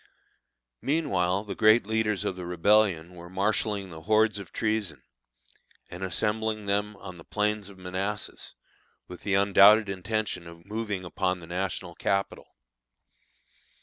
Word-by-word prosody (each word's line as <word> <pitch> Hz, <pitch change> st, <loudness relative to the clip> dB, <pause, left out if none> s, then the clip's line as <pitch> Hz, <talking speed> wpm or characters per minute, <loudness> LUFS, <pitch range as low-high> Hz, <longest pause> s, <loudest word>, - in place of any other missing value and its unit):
Meanwhile 100 Hz, -, +1 dB
the 105 Hz, -, -5 dB
great 110 Hz, 0 st, +5 dB
leaders 110 Hz, -2 st, 0 dB
of -, -, -1 dB
the 90 Hz, -, -7 dB
Rebellion 90 Hz, -1 st, +2 dB
were 85 Hz, -1 st, -11 dB
marshalling 100 Hz, 0 st, -1 dB
the 80 Hz, -1 st, -9 dB
hordes 110 Hz, +2 st, +2 dB
of 100 Hz, -, -10 dB
treason, 110 Hz, -5 st, -2 dB, 0.9 s
and 90 Hz, -, -8 dB
assembling 110 Hz, +3 st, -1 dB
them 105 Hz, +1 st, -1 dB
on 95 Hz, -2 st, -10 dB
the 80 Hz, -, -12 dB
plains 105 Hz, 0 st, -1 dB
of 100 Hz, -, -14 dB
Manassas, 95 Hz, +3 st, -4 dB, 0.5 s
with 90 Hz, -, -10 dB
the 100 Hz, -1 st, 0 dB
undoubted 100 Hz, +2 st, +6 dB
intention 100 Hz, -2 st, -3 dB
of 85 Hz, 0 st, -13 dB
moving 105 Hz, -3 st, -3 dB
upon 90 Hz, +2 st, -1 dB
the 85 Hz, -, -11 dB
national 90 Hz, +2 st, -3 dB
capital. 100 Hz, +1 st, -2 dB
100 Hz, 135 wpm, -27 LUFS, 90-105 Hz, 0.9 s, undoubted